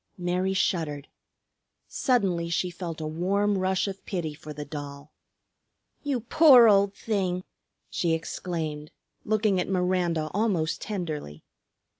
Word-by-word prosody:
Mary 180 +2 -1
shuddered. 150 -6 -1 0.8
Suddenly 190 -10 +1
she 180 +2 -1
felt 170 -2 -6
a 155 - -4
warm 195 +6 0
rush 190 +1 +1
of 195 0 -6
pity 170 -6 -3
for 150 +1 -10
the 150 0 -6
doll. 145 0 -8 0.9
"You 280 -4 -1
poor 255 -1 +7
old 200 -1 +4
thing!" 185 -4 -1 0.4
she 170 -2 0
exclaimed, 160 -2 -4 0.4
looking 215 -3 +2
at 180 - -2
Miranda 180 -4 0
almost 190 -6 0
tenderly. 155 - -5
180 Hz, 120 wpm, -27 LUFS, 160-200 Hz, 0.9 s, poor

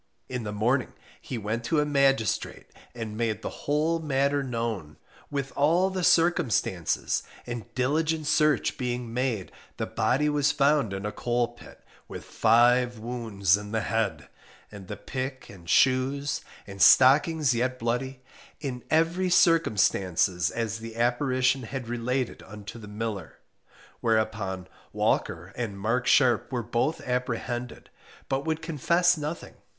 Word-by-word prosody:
In 125 -3 -4
the 105 - -3
morning 120 +6 0 0.3
he 125 - -5
went 110 +2 -3
to 155 +4 +1
a 150 - +2
magistrate, 140 -5 +1 0.3
and 110 -3 -5
made 110 -1 -2
the - - -7
whole 155 +3 +2
matter 140 -2 +1
known, 115 - -4 0.3
with 140 -2 -3
all 170 +7 +3
the 185 -1 -3
circumstances; 155 - +2 0.2
and 120 -4 -6
diligent 155 +4 0
search 150 0 +2
being 120 -2 -3
made 120 -6 -2 0.3
the - - -2
body 150 +4 +1
was 145 -1 +2
found 140 -5 +2
in 95 +1 -4
a 105 - -2
coal 120 +2 -1
pit, 120 - -16 0.2
with - - -8
five 120 +1 +3
wounds 110 -5 0
in 105 +1 -8
the 110 - +1
head, 100 - -1 0.4
and 100 -3 -10
the 105 - -6
pick 130 +3 -5
and 85 -4 -13
shoes, 135 +2 +2 0.2
and 100 -1 -8
stockings 145 - +6
yet 125 +2 -1
bloody, 125 +2 -3 0.4
in 130 -5 -5
every 165 +4 +2
circumstances 95 - +3
as 115 -1 -3
the 115 0 -8
apparition 125 +2 +1
had 125 0 -6
related 120 +1 -2
unto 105 +2 -9
the 105 - -10
miller: 105 -4 -5 0.6
whereupon 110 -4 -1 0.3
Walker 85 +4 -1
and 110 -5 -4
Mark 115 +5 0
Sharpe 120 -2 +3
were 120 -2 -2
both 120 +8 -1
apprehended, 125 -1 -3 0.4
but 135 +2 -1
would 160 0 -2
confess 170 +3 +2
nothing. 155 +1 -5
125 Hz, 140 wpm, -27 LUFS, 110-140 Hz, 0.6 s, stockings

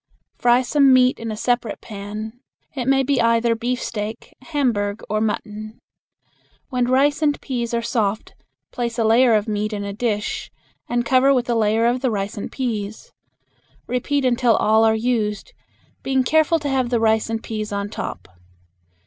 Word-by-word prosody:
Fry 245 +1 +4
some 275 +1 +4
meat 255 0 +4
in 230 0 -5
a 215 - -5
separate 240 -2 -1
pan. 215 +3 -7 0.3
It 255 -3 -4
may 270 0 +3
be 270 0 +1
either 230 0 +3
beefsteak, 230 -2 -4
Hamburg, 235 -9 -1
or 215 0 +1
mutton. 215 +1 -4 0.9
When 250 -2 0
rice 275 +4 +2
and 295 -2 +1
peas 240 -4 -3
are 235 0 -1
soft, 220 -3 -1 0.4
place 235 -1 -3
a 230 - +1
layer 230 +1 +5
of 210 +1 0
meat 215 0 -2
in 205 -1 -3
a 200 0 -4
dish 215 -1 -2 0.4
and 240 0 0
cover 260 +2 +4
with 245 -1 0
a - - +1
layer 220 +1 +2
of 245 +2 +1
the 260 - +1
rice 200 -2 -3
and 205 - -6
peas. 220 -5 -4 0.7
Repeat 265 +3 -1
until 240 -2 +3
all 220 +1 +3
are 220 0 +4
used, 220 - -1 0.5
being 265 -1 +1
careful 315 +5 +3
to 290 -2 -4
have 260 -3 0
the 240 -1 +1
rice 220 0 +2
and 225 0 -3
peas 215 -2 -4
on 200 0 -2
top. - - -6
235 Hz, 170 wpm, -21 LUFS, 215-255 Hz, 0.9 s, layer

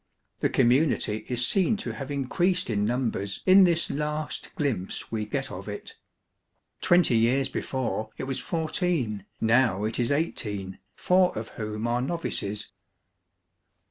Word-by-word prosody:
The - - +1
community 125 -4 +2
is 125 -1 +2
seen 195 - +2
to - - -4
have 135 -1 -6
increased 175 +4 0
in 105 -1 +1
numbers 115 -4 -2
in 190 0 +8
this 170 -1 +2
last 150 +1 -3
glimpse 120 -11 -2
we 110 -2 -2
get 135 +1 -3
of 95 +2 -7
it. 105 - -7 0.9
Twenty 175 -8 +4
years 125 +4 +3
before 125 -5 -2
it - - -4
was 130 0 -2
fourteen, 160 - -1
row 115 -3 +3
it 110 +2 -2
Is 120 +1 +1
eighteen, 105 - -2 0.2
four 180 -4 +3
of 110 +1 -4
whom 105 0 -5
are 120 +1 +1
novices. 125 -9 -3
125 Hz, 140 wpm, -27 LUFS, 110-155 Hz, 0.9 s, in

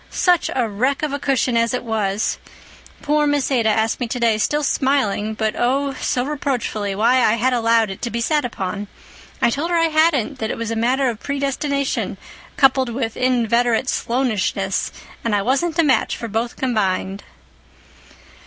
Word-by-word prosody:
Such 355 -3 +2
a 245 -3 +1
wreck 255 +8 -1
of 300 -2 -1
a 285 - -2
cushion 265 -3 +1
as 230 +1 +2
it 250 - -4
was! 215 -2 -1 0.6
Poor 300 0 +2
Miss 290 -2 0
Ada 235 -4 +2
asked 220 +1 +1
me 245 - -2
today, 230 -3 +1
still 295 +7 0
smiling, 220 -7 0
but 220 0 -1
oh, 275 +3 0
so 245 0 0
reproachfully, 245 -8 -2
why 235 +5 +3
I 215 - +4
had 250 +3 +1
allowed 230 -3 +2
it 190 - -9
to 240 - -2
be 235 - -3
sat 295 +5 +1
upon. 205 -3 -4 0.6
I 235 - +4
told 295 +7 -2
her 345 - +2
I 330 0 +3
hadn't—that 290 -7 +1
it - - -3
was 230 0 -3
a - - -1
matter 255 +4 +1
of 230 -3 -2
predestination 280 0 -2 0.4
coupled 265 -2 +4
with 230 -1 -3
inveterate 240 0 +1
Sloanishness 210 -6 -1 0.3
and 230 -3 +1
I 200 - +1
wasn't 305 - 0
a 335 - +4
match 275 -4 +2
for 230 - -5
both 225 +2 -2
combined." 200 -5 -1
245 Hz, 170 wpm, -20 LUFS, 220-275 Hz, 0.6 s, I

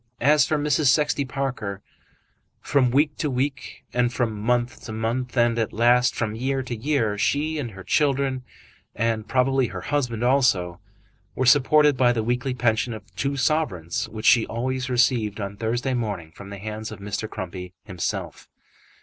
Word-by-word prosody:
As 145 +3 +4
for 155 - +1
Mrs. 150 0 +1
Sexty 145 +1 +2
Parker, 130 -8 -4 0.8
from 135 -3 +2
week 145 +4 +2
to 150 - -1
week, 135 +2 -3
and 120 -1 +2
from 120 -3 -1
month 120 +4 -1
to 110 - -6
month, 120 +3 -3
and 120 -1 +3
at 110 - -1
last 120 +2 +3
from 110 -2 -2
year 130 +3 -1
to 125 -1 -5
year, 115 -4 0
she 155 +7 0
and 125 -5 -3
her 95 -3 -11
children, 135 -1 +1 0.5
and 115 -1 -1
probably 130 0 +2
her - - -7
husband 125 -6 -1
also, 100 -10 +2 0.6
were 130 - 0
supported 145 +2 +5
by 120 -1 +4
the 115 -2 -1
weekly 125 +3 -1
pension 115 -1 0
of 105 - -9
two 140 +1 -1
sovereigns 110 - -1
which 110 0 -7
she 115 -3 +5
always 130 +3 -3
received 120 -4 +1
on 100 -1 -4
Thursday 120 +5 -1
morning 105 -9 -3
from 100 +4 -11
the 100 - -7
hands 110 +2 -6
of 110 - -7
Mr. 105 +2 -4
Crumpy 90 -3 -6
himself. 90 -4 -5
120 Hz, 165 wpm, -24 LUFS, 110-135 Hz, 0.8 s, supported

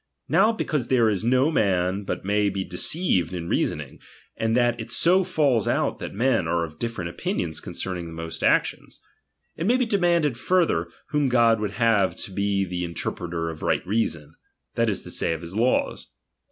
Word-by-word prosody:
Now 220 - +4
be 225 - -3
cause 140 -6 -1
there 120 -4 +3
is 100 0 -2
no 130 +6 +3
man 95 - +1
but - - -4
may 105 0 +2
be 95 0 -3
deceived 90 - 0
in 85 -1 -5
reasoning, - - -2 0.4
and 115 +1 0
that 120 -1 +2
it - - -6
so 185 +3 +3
falls 145 - +1
out - - 0
that - - -5
men 115 -6 +1
are 85 0 +1
of 80 -1 -13
different 115 -8 -3
opinions 80 -2 -3
concerning 90 -3 -5
the - - -9
most 80 0 -6
actions; - - +1 0.6
it 165 - -2
may 245 +3 +4
be 255 - +1
demanded 170 - +1
further, 165 - +2 0.2
whom 150 -2 +1
God 115 -2 +4
would 105 -2 -3
have 110 -3 +2
to - - -7
be 100 0 0
the 90 -1 -4
interpreter 85 -1 -3
of 80 - -10
right - - 0
reason, 95 -7 -2 0.4
that 115 -1 +1
is 100 - -2
to - - -8
say, - - 0
of 80 - -5
his 85 +2 -8
laws. 120 +4 0
105 Hz, 190 wpm, -24 LUFS, 90-130 Hz, 0.6 s, Now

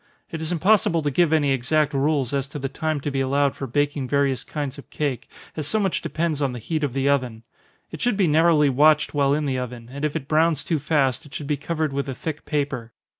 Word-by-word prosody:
It 160 - -5
is 160 +1 -3
impossible 185 -1 +3
to 145 - 0
give 165 +3 +3
any 150 -3 +3
exact 145 +4 +1
rules 140 -2 +1
as 140 -1 -1
to 150 - -7
the 135 -1 -3
time 155 +2 -2
to 145 - -3
be 135 0 -1
allowed 140 +1 +1
for 135 - -5
baking 145 +1 0
various 140 -1 +1
kinds 145 -2 -5
of - - -13
cake, 140 -5 -3 0.3
as 155 -2 -3
so 220 - +1
much 195 -4 0
depends 160 -3 -2
on 135 -3 0
the - - -5
heat 155 +7 -3
of 140 -4 -1
the 135 0 0
oven. 125 -5 0 0.5
It 160 - -8
should 245 -4 +1
be 195 - +3
narrowly 160 -1 +4
watched 150 +3 +4
while 140 -1 +2
in 150 0 -1
the 130 -2 -1
oven, 120 -2 -7
and 140 +2 -7
if 150 0 -1
it 145 -4 -4
browns 155 -1 +2
too 160 0 0
fast, 145 -2 0
it 140 - -13
should 150 - -5
be 150 +1 0
covered 155 0 -2
with 140 0 -2
a 130 - -4
thick 155 +3 -5
paper. 140 -6 -2
145 Hz, 245 wpm, -23 LUFS, 135-155 Hz, 0.5 s, narrowly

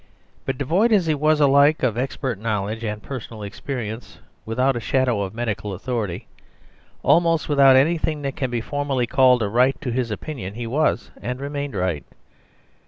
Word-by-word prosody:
But 135 - -1
devoid 175 - +2
as 200 -5 +4
he 160 - +2
was 155 +1 +2
alike 140 +1 +4
of 120 -4 +2
expert 125 -2 -3
knowledge 110 0 -2
and 105 -1 -4
personal 115 -5 -7
experience, 110 +1 -6 0.3
without 125 +4 +1
a - - -1
shadow 125 -3 +1
of 100 +1 -4
medical 110 -3 -3
authority, 105 -3 -3 0.8
almost 165 -1 +3
without 140 -3 +6
anything 155 +1 +2
that 140 -1 -3
can 130 -3 -2
be 120 -1 -2
formally 140 -1 -1
called 125 0 +4
a - - 0
right 125 +6 +2
to 125 - -3
his 120 0 -1
opinion, 105 -3 -6
he 120 0 -5
was, 135 +1 0
and 125 +2 -4
remained, 140 -2 -4
right. 90 -5 -1
125 Hz, 170 wpm, -22 LUFS, 110-145 Hz, 0.8 s, without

